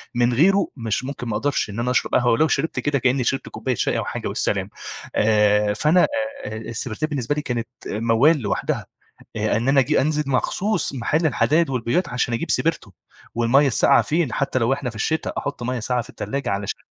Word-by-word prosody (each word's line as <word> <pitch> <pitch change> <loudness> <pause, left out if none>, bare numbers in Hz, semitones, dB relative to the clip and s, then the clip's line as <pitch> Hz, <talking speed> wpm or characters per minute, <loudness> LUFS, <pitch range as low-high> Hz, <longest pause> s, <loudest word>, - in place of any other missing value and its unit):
من 120 0 +2
غيره 195 +10 +4
مش 115 -1 -2
ممكن 130 -2 -6
ما 105 -2 -1
أقدرِش 140 -2 -1
إن 100 +3 -6
أنا 125 +1 0
أشرَب 125 - +1
قهوة، 120 -1 +3
ولو 155 +7 +3
شربت 150 +2 -1
كده 145 -2 0
كأني 130 +1 +1
شربت 135 +3 -1
كوباية 130 -2 -3
شاي - - 0
أو - - -2
حاجة - - -4
والسلام. - - -1 0.5
آآ 105 -1 +3
فأنا 155 - +3 0.4
آآ، 110 - -5
السبرتاية 115 +5 -4
بالنسبة 145 -1 -1
لي 150 - -2
كانت 120 -5 -3 0.2
موّال 115 +9 +3
لوحدها. 105 - -2 0.5
آآ، - - +1
إن 115 +4 -1
أنا 135 0 +5
آجي 150 +3 +2
أنزل 150 +2 0
مخصوص 180 +6 0
محل 150 +6 0
الحدايد 155 +1 +2
والبويات 130 +8 0
عشان 125 -1 -1
أجيب 115 - -3
سبرتو، - - 0 0.4
والمَيَّة 120 +5 +3
الساقعة، 135 +2 +4
فين؟ 160 -4 0
حتى 140 -1 0
لو 120 +1 +1
إحنا 135 -2 -2
في 110 - -12
الشتا، 160 +8 -1
أحُطّ 145 -3 -4
مَيَّة 125 0 -2
ساقعة 125 +2 -1
في 125 - -13
التلاجة 140 -3 -4
علشان 100 0 -3
130 Hz, 195 wpm, -22 LUFS, 115-145 Hz, 0.5 s, أنا